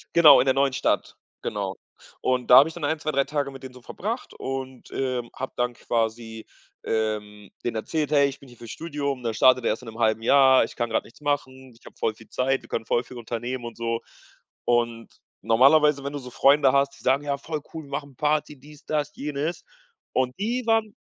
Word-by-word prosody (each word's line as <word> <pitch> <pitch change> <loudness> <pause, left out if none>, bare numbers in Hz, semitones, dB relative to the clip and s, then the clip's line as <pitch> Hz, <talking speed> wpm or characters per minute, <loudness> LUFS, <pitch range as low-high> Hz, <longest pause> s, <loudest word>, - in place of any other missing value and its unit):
Genau, 170 -5 +9
in 125 - +3
der 130 - +3
neuen 135 0 +2
Stadt, 135 - -1 0.2
genau. - - -3 0.5
Und 125 -1 0
da 125 - +10
habe 145 +4 +7
ich 165 - -11
dann 170 - -8
1, 155 +2 0
2, 155 0 -2
3 140 -1 +2
Tage 145 -1 -2
mit 135 -1 -12
denen 130 -1 -9
so 125 - -14
verbracht 220 - -5
und 130 -1 -6
ähm, 125 -3 -2
habe 130 - -5
dann 125 0 0
quasi 115 -1 -3 0.4
ähm, 105 -2 -2
denen 120 - -2
erzählt: 150 +6 -2
„Hey, 140 -2 +5
ich 140 +1 -10
bin 140 - -15
hier 120 -1 -16
fürs 115 0 -11
Studium, 145 -5 -4
das 115 -2 -2
startet 130 +2 +5
er - - +3
erst 110 - -3
in 125 - -12
'nem 110 +1 -11
halben 110 -1 +2
Jahr, 130 +2 +6
ich - - -6
kann 120 -1 -2
grad 110 - 0
nichts 115 - -18
machen, 130 -3 -3
ich - - -25
habe - - -13
voll 110 - 0
viel 115 - -17
Zeit, 135 +1 0
wir 115 - -17
können 115 - -3
voll 120 - +1
viel 125 +1 -12
unternehmen”, 120 +2 -4
und 115 - -7
so. 115 0 -2 0.6
Und 120 -1 0 0.3
normalerweise, 140 +6 +4
wenn 140 +1 -4
du 145 - -4
so 125 -2 -9
Freunde 140 +1 +5
hast, 140 0 +2
die - - -18
sagen: 135 +2 +2
„Ja, 140 -1 -1
voll 155 +1 -5
cool, 160 -1 -6
wir 140 - -16
machen 140 -2 -5
Party, 150 +1 0
dies, 145 +2 -16
das, 150 -1 -1
jenes." 150 +3 -3 0.5
Und 130 -1 +1
die 240 +4 -1
waren 225 -1 +1
130 Hz, 225 wpm, -25 LUFS, 120-145 Hz, 0.6 s, da